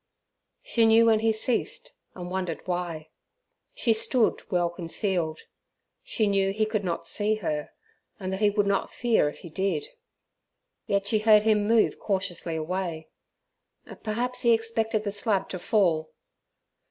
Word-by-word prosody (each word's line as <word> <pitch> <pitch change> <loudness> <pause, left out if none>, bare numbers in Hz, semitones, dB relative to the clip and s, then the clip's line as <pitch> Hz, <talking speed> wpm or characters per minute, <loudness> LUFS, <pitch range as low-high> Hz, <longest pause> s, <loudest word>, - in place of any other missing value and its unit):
She 230 -1 +3
knew 225 +1 +6
when 220 -1 +4
he 225 0 +2
ceased, 275 - -2 0.2
and 180 -1 -7
wondered 180 -3 -3
why. 175 -3 -3 0.7
She 230 - +2
stood 230 +1 +1
well 175 -3 +1
concealed; 170 -1 -2 0.6
she 220 - 0
knew 195 -1 +2
he 215 +2 0
could 215 -1 -2
not 170 -2 -3
see 210 +5 0
her, 155 -8 -3 0.5
and 190 -1 -4
that 190 - -3
he 210 -1 +4
would 205 0 +1
not 200 -1 0
fear 230 -10 +2
if - - -11
he 170 - -10
did, 195 - -1 1.0
yet 200 0 +1
she 215 +1 +2
heard 215 -1 +5
him 210 -2 +2
move 225 0 +3
cautiously 185 -4 -2
away. 165 0 -3 0.9
Perhaps 240 +4 -2
he 235 -1 +5
expected 225 -1 0
the 205 - -2
slab 205 -1 -1
to 185 - -5
fall. 170 -6 +1
200 Hz, 150 wpm, -26 LUFS, 180-220 Hz, 1.0 s, knew